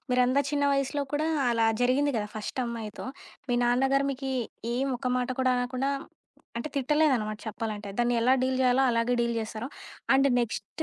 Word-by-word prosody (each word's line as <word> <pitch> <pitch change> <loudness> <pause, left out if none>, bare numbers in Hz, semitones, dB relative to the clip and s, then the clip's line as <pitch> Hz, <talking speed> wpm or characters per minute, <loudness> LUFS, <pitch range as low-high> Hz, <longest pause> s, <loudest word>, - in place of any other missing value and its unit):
మీరంత 250 +2 +3
చిన్న 285 -1 +1
వయసులో 275 +1 0
కూడా, 305 +2 0 0.2
అలా 230 -1 +2 0.2
జరిగింది 280 +4 +3
గదా! 210 -1 -1
ఫస్టమ్మాయితో, 230 0 -4 0.4
మీ 245 - +1
నాన్న 245 +3 +3
గారు 275 0 +3
మీకీ 265 0 -4 0.4
ఏం 265 +2 0
ఒక్క 250 - -3
మాట 250 - -1
కూడా 255 - +3
అనకుండా 255 +2 -1 0.7
అంటే, 270 - -4
తిట్టలేదనమాట 260 -6 +2
చెప్పాలంటే. 210 -1 -4
దాన్ని 240 0 +2
ఎలా 255 +2 +4
డీల్ 260 0 +1
జెయ్యాలో 255 +1 +4
అలాగే 230 +1 +1
డీల్ 235 0 0
జేశారు. 220 +3 -5 0.5
And 275 +1 +5
next 235 +7 -4
250 Hz, 160 wpm, -28 LUFS, 235-270 Hz, 0.7 s, And